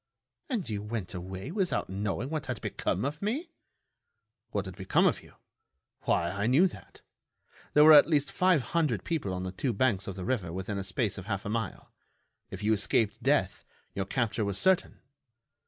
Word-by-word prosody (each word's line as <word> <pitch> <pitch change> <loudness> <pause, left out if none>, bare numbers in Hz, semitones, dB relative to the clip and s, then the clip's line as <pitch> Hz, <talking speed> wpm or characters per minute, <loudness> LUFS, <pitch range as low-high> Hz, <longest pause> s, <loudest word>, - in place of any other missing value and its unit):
"And 230 - -2
you 105 -3 -3
went 105 -3 -5
away 95 - -6
without 190 -1 0
knowing 105 +7 -3
what 150 -4 -3
had 125 -5 -3
become 100 - -2
of 150 +3 -4
me?" 275 - -2 1.0
"What 100 -2 -2
had 95 -2 -8
become 95 -1 +2
of - - +2
you? - - -18 0.7
Why, 85 - +1
I 100 +3 -1
knew 140 +10 +5
that. - - -14 0.7
There 150 - +8
were 155 +1 +9
at 150 +2 +8
least 145 -3 +2
five 180 -7 +3
hundred 145 - +1
people 155 - -2
on 90 0 -3
the 95 - -3
two 120 +6 -2
banks 105 -3 +1
of 100 - -4
the 95 -2 -6
river 110 -10 -1
within 95 +3 -4
a - - -3
space 100 +2 -1
of 95 - -10
half 100 -3 -3
a - - -3
mile. 110 -3 -4 0.6
If 95 +2 -7
you 110 +1 +3
escaped 105 +1 +1
death, - - +1 0.3
your 95 - -2
capture 110 0 -1
was 100 -1 -1
certain." 190 - +2
110 Hz, 190 wpm, -29 LUFS, 95-145 Hz, 1.0 s, were